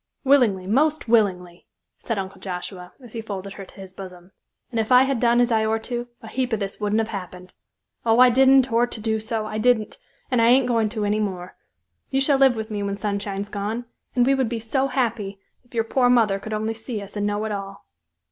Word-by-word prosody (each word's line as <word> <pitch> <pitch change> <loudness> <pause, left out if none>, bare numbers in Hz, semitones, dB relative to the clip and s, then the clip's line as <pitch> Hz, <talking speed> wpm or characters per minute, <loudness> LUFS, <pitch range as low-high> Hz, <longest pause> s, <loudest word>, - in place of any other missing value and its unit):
"Willin'ly, 240 -9 +4
most 295 +9 +1
willin'ly," 185 -6 +1 0.3
said 225 - -3
Uncle 190 -1 -5
Joshua, 180 -1 -6
as 240 - -12
he 230 - -4
folded 195 -2 -6
her 195 - -9
to - - -18
his 190 -1 -9
bosom, 185 -1 -11 0.4
"and 230 - -1
if 220 +2 -1
I 250 +1 +8
had 270 -2 0
done 235 0 +3
as 245 0 +3
I 220 -1 +3
or'to, 225 +2 -2 0.2
a - - -9
heap 250 +2 -2
of 220 - 0
this 195 -1 -5
wouldn't 210 +1 +1
have 225 - -4
happened. 185 -2 -8 0.5
Oh, 225 0 +3
I 255 -1 +8
didn't 265 0 +5
or'to 240 0 +1
do 220 0 -1
so, 220 0 -3
I 215 0 -4
didn't; 220 -2 +1 0.3
and 250 -2 +3
I 230 - +5
ain't 255 +2 +5
goin' 230 -3 +1
to 215 -1 -3
any 210 +1 +1
more. 185 -4 -4 0.5
You 270 - +1
shall 275 0 +3
live 265 -2 +5
with 220 0 -5
me 205 -1 -2
when 200 0 -2
Sunshine's 200 -1 -3
gone; 215 +4 -3 0.3
and 245 -1 +4
we 270 - +4
would 265 -4 +1
be 235 -1 -3
so 265 +5 0
happy, 220 -7 -2 0.2
if 245 -1 -18
your 225 - +2
poor 245 +2 +2
mother 220 -5 +3
could 215 - -8
only 220 +1 -1
see 225 0 -6
us 200 0 -10
and 205 0 -1
know 205 +1 -1
it 220 - -3
all." 195 -1 -6
220 Hz, 225 wpm, -23 LUFS, 200-245 Hz, 0.5 s, I